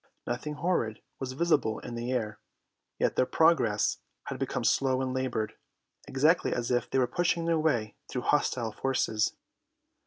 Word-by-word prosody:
Nothing 125 Hz, +5 st, -3 dB
horrid 145 Hz, -9 st, 0 dB, 0.2 s
was 130 Hz, -1 st, -4 dB
visible 145 Hz, -7 st, +2 dB
in 120 Hz, -, -7 dB
the 120 Hz, +1 st, -3 dB
air, 110 Hz, -4 st, -2 dB, 0.6 s
yet -, -, +1 dB
their 130 Hz, -, +3 dB
progress 160 Hz, -, +3 dB, 0.2 s
had -, -, -6 dB
become -, -, -2 dB
slow 130 Hz, -1 st, +2 dB
and 130 Hz, -1 st, -1 dB
laboured, 130 Hz, -4 st, -1 dB, 0.5 s
exactly 155 Hz, +6 st, +3 dB
as 120 Hz, 0 st, -1 dB
if 120 Hz, -1 st, +1 dB
they -, -, 0 dB
were 130 Hz, -, +4 dB
pushing 170 Hz, +4 st, 0 dB
their 165 Hz, -1 st, +2 dB
way 120 Hz, -9 st, +1 dB, 0.2 s
through 125 Hz, -, -3 dB
hostile 125 Hz, -5 st, +1 dB
forces. 110 Hz, -2 st, 0 dB
130 Hz, 155 wpm, -29 LUFS, 120-150 Hz, 0.6 s, were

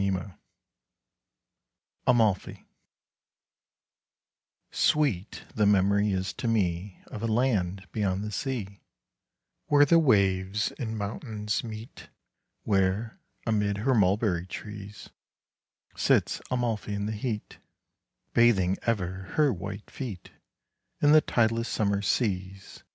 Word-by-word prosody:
C. 100 Hz, -, +1 dB
TRENCH. 95 Hz, 0 st, -3 dB, 1.7 s
AMALFI 110 Hz, -6 st, +2 dB, 2.1 s
Sweet 125 Hz, -, +1 dB
the 105 Hz, -2 st, +2 dB
memory 100 Hz, +1 st, +3 dB
is 95 Hz, 0 st, -2 dB
to 120 Hz, -, -4 dB
me 95 Hz, -4 st, -1 dB
Of 105 Hz, -, -8 dB
a 115 Hz, -, -1 dB
land 105 Hz, -6 st, 0 dB
beyond 100 Hz, -2 st, -1 dB
the 105 Hz, -, -4 dB
sea, 105 Hz, -4 st, -4 dB, 0.9 s
Where 145 Hz, 0 st, +6 dB
the 165 Hz, +4 st, +5 dB
waves 100 Hz, -, +2 dB
and 110 Hz, -4 st, -3 dB
mountains 105 Hz, 0 st, -3 dB
meet, 110 Hz, 0 st, -9 dB, 0.5 s
Where, 100 Hz, +3 st, 0 dB, 0.3 s
amid 105 Hz, -3 st, +1 dB
her 130 Hz, +6 st, +1 dB
mulberry 95 Hz, -4 st, +2 dB
trees, 105 Hz, 0 st, -9 dB, 0.8 s
Sits -, -, +2 dB
Amalfi 115 Hz, -4 st, -1 dB
in 100 Hz, 0 st, -2 dB
the 105 Hz, -, -2 dB
heat, 110 Hz, 0 st, -4 dB, 0.7 s
5 -, -, -46 dB
Bathing 100 Hz, -6 st, +4 dB
ever 100 Hz, -7 st, 0 dB, 0.2 s
her 150 Hz, -4 st, +4 dB
white 100 Hz, +2 st, -7 dB
feet 115 Hz, -10 st, -7 dB, 0.7 s
In 145 Hz, -, +4 dB
the 155 Hz, 0 st, +8 dB
tideless 115 Hz, -2 st, +1 dB
summer 100 Hz, -2 st, 0 dB
seas. 95 Hz, -3 st, -2 dB
105 Hz, 110 wpm, -28 LUFS, 95-115 Hz, 2.1 s, the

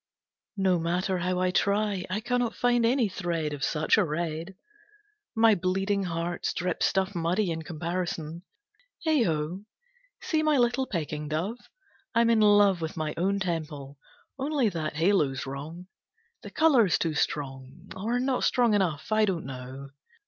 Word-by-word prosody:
"No 190 Hz, -2 st, +2 dB
matter 180 Hz, +3 st, -1 dB
how 180 Hz, +1 st, -1 dB
I 185 Hz, 0 st, +1 dB
try, 200 Hz, -1 st, +1 dB
I 210 Hz, +4 st, -2 dB
cannot 245 Hz, 0 st, -1 dB
find 240 Hz, -1 st, +2 dB
any 245 Hz, -1 st, +2 dB
thread 170 Hz, -5 st, -2 dB
of 145 Hz, -1 st, -5 dB
such 155 Hz, +7 st, +2 dB
a -, -, +4 dB
red. 165 Hz, +2 st, -3 dB, 0.8 s
My 225 Hz, 0 st, +6 dB
bleeding 195 Hz, +2 st, 0 dB
hearts 170 Hz, 0 st, -3 dB
drip 180 Hz, -1 st, -2 dB
stuff 190 Hz, +1 st, +1 dB
muddy 175 Hz, +2 st, 0 dB
in 165 Hz, 0 st, -3 dB
comparison. 170 Hz, 0 st, -4 dB, 0.6 s
Heigh 310 Hz, -4 st, +3 dB
ho! 160 Hz, +4 st, -2 dB, 0.6 s
See 315 Hz, -2 st, 0 dB
my 305 Hz, -2 st, +3 dB
little 245 Hz, +2 st, +2 dB
pecking 150 Hz, -4 st, -3 dB
dove? 175 Hz, +11 st, -2 dB, 0.6 s
I'm 230 Hz, 0 st, +4 dB
in 225 Hz, -, +4 dB
love 205 Hz, -3 st, +5 dB
with 160 Hz, +1 st, -4 dB
my 155 Hz, -1 st, -2 dB
own 195 Hz, +4 st, +1 dB
temple. 150 Hz, -6 st, -4 dB, 0.4 s
Only 275 Hz, -4 st, +1 dB
that 160 Hz, -5 st, -4 dB
halo's 155 Hz, -6 st, +1 dB
wrong. 150 Hz, +6 st, -7 dB, 0.6 s
The -, -, -9 dB
colour's 265 Hz, -, +4 dB
too 165 Hz, -2 st, -1 dB
strong, 140 Hz, +3 st, -4 dB
or 225 Hz, +6 st, -1 dB
not 255 Hz, 0 st, 0 dB
strong 240 Hz, -3 st, +3 dB
enough. 175 Hz, -5 st, 0 dB
I 215 Hz, 0 st, +4 dB
don't 180 Hz, -7 st, -2 dB
know. 130 Hz, +1 st, -8 dB
180 Hz, 150 wpm, -27 LUFS, 160-215 Hz, 0.8 s, My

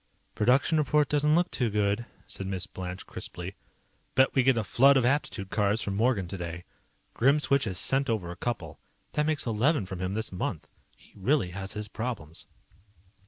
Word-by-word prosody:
"Production 135 Hz, +8 st, +3 dB
report 150 Hz, 0 st, +2 dB
doesn't 150 Hz, +1 st, +3 dB
look 175 Hz, +1 st, +2 dB
too 125 Hz, -3 st, 0 dB
good," 105 Hz, +2 st, 0 dB, 0.2 s
said 95 Hz, -, -6 dB
Miss 95 Hz, -1 st, -2 dB
Blanche, 95 Hz, -1 st, -7 dB
crisply. 90 Hz, +2 st, -7 dB, 0.6 s
"Bet 130 Hz, 0 st, +4 dB
we 135 Hz, -, +4 dB
get 130 Hz, -1 st, +3 dB
a 115 Hz, -, +1 dB
flood 135 Hz, +8 st, +5 dB
of 130 Hz, -, +2 dB
aptitude 120 Hz, -7 st, -1 dB
cards 105 Hz, 0 st, +1 dB
from 100 Hz, -, -3 dB
Morgan 110 Hz, -4 st, +1 dB
today. 85 Hz, -2 st, -6 dB, 0.5 s
Grimswitch 140 Hz, +1 st, +3 dB
has 95 Hz, -4 st, -2 dB
sent 135 Hz, +7 st, +3 dB
over 100 Hz, -7 st, -1 dB
a -, -, -7 dB
couple. 85 Hz, -8 st, -4 dB, 0.3 s
That 150 Hz, 0 st, +1 dB
makes 155 Hz, -2 st, 0 dB
eleven 120 Hz, -, +1 dB
from 95 Hz, -1 st, -7 dB
him 95 Hz, +2 st, -2 dB
this 110 Hz, 0 st, 0 dB
month. 90 Hz, -, -4 dB, 0.3 s
He -, -, -22 dB
really 100 Hz, -1 st, +1 dB
has 95 Hz, +1 st, -5 dB
his 105 Hz, 0 st, -5 dB
problems." 105 Hz, -9 st, -6 dB
110 Hz, 175 wpm, -28 LUFS, 95-135 Hz, 0.6 s, flood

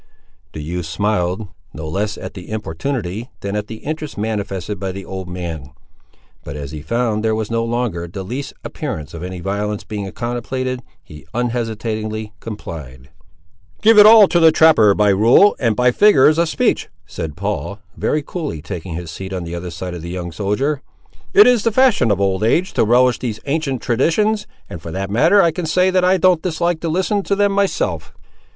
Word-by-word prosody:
The 75 Hz, -, -6 dB
youth 85 Hz, +1 st, -4 dB
smiled, 95 Hz, +2 st, -1 dB, 0.3 s
no 80 Hz, 0 st, -6 dB
less 100 Hz, +6 st, -2 dB
at -, -, -7 dB
the 90 Hz, -2 st, -10 dB
importunity 110 Hz, -, -4 dB
than 100 Hz, +1 st, -3 dB
at 105 Hz, 0 st, -3 dB
the 110 Hz, -, -7 dB
interest 155 Hz, 0 st, -5 dB
manifested 105 Hz, -2 st, -3 dB
by 95 Hz, -1 st, -3 dB
the 95 Hz, +1 st, -8 dB
old 95 Hz, -1 st, -6 dB
man; 85 Hz, -6 st, -6 dB, 0.7 s
but 70 Hz, -, -7 dB
as 70 Hz, -2 st, -6 dB
he 75 Hz, -1 st, -7 dB
found 110 Hz, +5 st, -1 dB
there 110 Hz, -1 st, +1 dB
was 110 Hz, 0 st, -3 dB
no 115 Hz, 0 st, 0 dB
longer 115 Hz, -8 st, -2 dB
the 95 Hz, +3 st, -7 dB
least 125 Hz, +9 st, -5 dB
appearance 75 Hz, -2 st, -5 dB
of 85 Hz, -, -7 dB
any 90 Hz, 0 st, -6 dB
violence 105 Hz, +2 st, -2 dB
being 100 Hz, -3 st, -5 dB
contemplated, 125 Hz, +1 st, -3 dB, 0.2 s
he 75 Hz, 0 st, -14 dB
unhesitatingly 110 Hz, -3 st, -3 dB
complied. 75 Hz, -, -9 dB, 0.7 s
"Give 220 Hz, 0 st, +7 dB
it 210 Hz, -, +10 dB
all 215 Hz, -2 st, +9 dB
to 175 Hz, -, +3 dB
the 165 Hz, -1 st, +7 dB
trapper 135 Hz, -12 st, +5 dB
by 105 Hz, -1 st, +3 dB
rule, 115 Hz, -, +5 dB
and 115 Hz, -4 st, +1 dB
by 125 Hz, +1 st, +3 dB
figures 155 Hz, -, +5 dB
of 170 Hz, -1 st, +2 dB
speech," -, -, 0 dB, 0.2 s
said 75 Hz, -3 st, -6 dB
Paul, 100 Hz, +1 st, -3 dB, 0.2 s
very 150 Hz, -1 st, -1 dB
coolly 150 Hz, -, -5 dB
taking 85 Hz, +1 st, -6 dB
his 85 Hz, -1 st, -6 dB
seat 95 Hz, +3 st, -7 dB
on 90 Hz, -2 st, -3 dB
the 85 Hz, 0 st, -6 dB
other 85 Hz, +1 st, -5 dB
side 90 Hz, +2 st, -6 dB
of 85 Hz, -, -6 dB
the 85 Hz, -, -7 dB
young 90 Hz, -1 st, -5 dB
soldier. 115 Hz, -, -1 dB, 0.5 s
"It 405 Hz, +1 st, +8 dB
is 245 Hz, -4 st, +4 dB
the 230 Hz, -, +2 dB
fashion 240 Hz, -, +3 dB
of 100 Hz, -2 st, +1 dB
old 95 Hz, 0 st, 0 dB
age 170 Hz, +12 st, +1 dB
to -, -, +2 dB
relish 125 Hz, +2 st, +3 dB
these 110 Hz, -4 st, -4 dB
ancient 140 Hz, -3 st, -2 dB
traditions, 210 Hz, -, +1 dB, 0.2 s
and, 85 Hz, -, -8 dB
for 80 Hz, -, -8 dB
that 95 Hz, +3 st, -4 dB
matter, 165 Hz, -, +5 dB
I 170 Hz, -, +3 dB
can 165 Hz, +1 st, -4 dB
say 185 Hz, +4 st, +3 dB
that 185 Hz, -1 st, +2 dB
I 185 Hz, +1 st, +4 dB
don't 180 Hz, -2 st, +3 dB
dislike 170 Hz, -1 st, -1 dB
to 165 Hz, -, -3 dB
listen 190 Hz, +5 st, 0 dB
to 200 Hz, -, -1 dB
them 205 Hz, 0 st, +2 dB
myself." 90 Hz, -, -1 dB
110 Hz, 195 wpm, -19 LUFS, 90-155 Hz, 0.7 s, it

